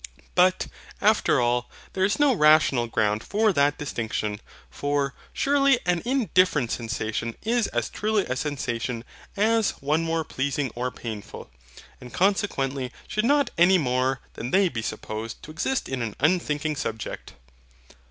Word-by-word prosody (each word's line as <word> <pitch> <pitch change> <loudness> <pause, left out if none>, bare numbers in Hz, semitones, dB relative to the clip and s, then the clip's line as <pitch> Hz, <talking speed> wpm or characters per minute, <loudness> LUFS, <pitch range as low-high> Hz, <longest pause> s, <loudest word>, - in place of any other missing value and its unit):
But, 185 +1 +3 0.3
after 210 -9 +3
all, 120 0 +1 0.2
there 190 - 0
is 200 +2 +2
no 290 -2 +4
rational 150 - +4
ground 110 -1 0
for 215 0 +2
that 145 -2 +2
distinction; 110 -6 -3 0.3
for, 145 -1 -1 0.2
surely 275 -2 +3
an 180 -1 +1
indifferent 185 - +2
sensation 115 0 -3
is 230 0 +1
as 120 -1 -1
truly 215 -1 0
a 130 - -2
SENSATION 125 -4 -3 0.3
as 225 +1 +2
one 150 +4 +1
more 165 0 0
pleasing 135 -2 -2
or 125 +1 -2
painful; 110 -4 -8 0.5
and 125 - -11
consequently 140 -9 0 0.2
should 215 +1 -1
not 285 +2 +3
any 185 +2 +6
more 130 -3 0
than 120 - -5
they 190 +4 +4
be 115 -6 -4
supposed 110 +2 -5
to 155 - -9
exist 240 +12 -1
in 130 -2 -3
an 115 -3 -3
unthinking 155 -1 +1
subject. 110 -4 -5
145 Hz, 140 wpm, -25 LUFS, 120-190 Hz, 0.5 s, any